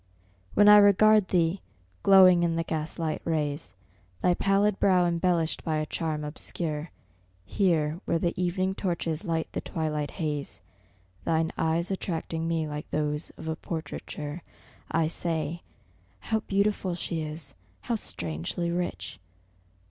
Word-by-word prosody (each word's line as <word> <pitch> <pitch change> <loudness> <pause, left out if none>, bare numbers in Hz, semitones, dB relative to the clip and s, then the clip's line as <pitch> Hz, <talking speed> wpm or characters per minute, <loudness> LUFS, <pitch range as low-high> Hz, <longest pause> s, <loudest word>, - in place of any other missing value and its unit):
When 205 - +6
I 210 0 +10
regard 210 0 +6
thee, 175 +1 +1 0.4
glowing 185 -2 +7
in 170 -1 +1
the 165 - 0
gaslight 160 0 -2
rays, 150 - -2 0.5
Thy 180 - +4
pallid 195 +2 +2
brow 185 -2 +4
embellished 170 -1 0
by 155 -1 0
a 155 - -1
charm 155 -1 -3
obscure, 150 +1 -4 0.6
Here 160 - +1
where 165 - +1
the 170 +1 0
evening 185 +1 0
torches 170 -3 -2
light 165 -4 -1
the - - -3
twilight 150 -2 -2
haze, 150 -5 -4 0.6
Thine 160 0 +1
eyes 165 +3 0
attracting 165 -3 -3
me 165 -2 0
like 150 0 -6
those 150 0 -2
of - - -8
a 160 - -1
portraiture, 155 -1 -6 0.5
I 165 0 +2
say 165 0 -2 0.6
How 220 - 0
beautiful 200 -3 0
she 170 -1 -3
is! 150 -2 -7 0.3
how 240 - -2
strangely 85 - -3
rich! 100 - -3
165 Hz, 135 wpm, -27 LUFS, 155-180 Hz, 0.6 s, I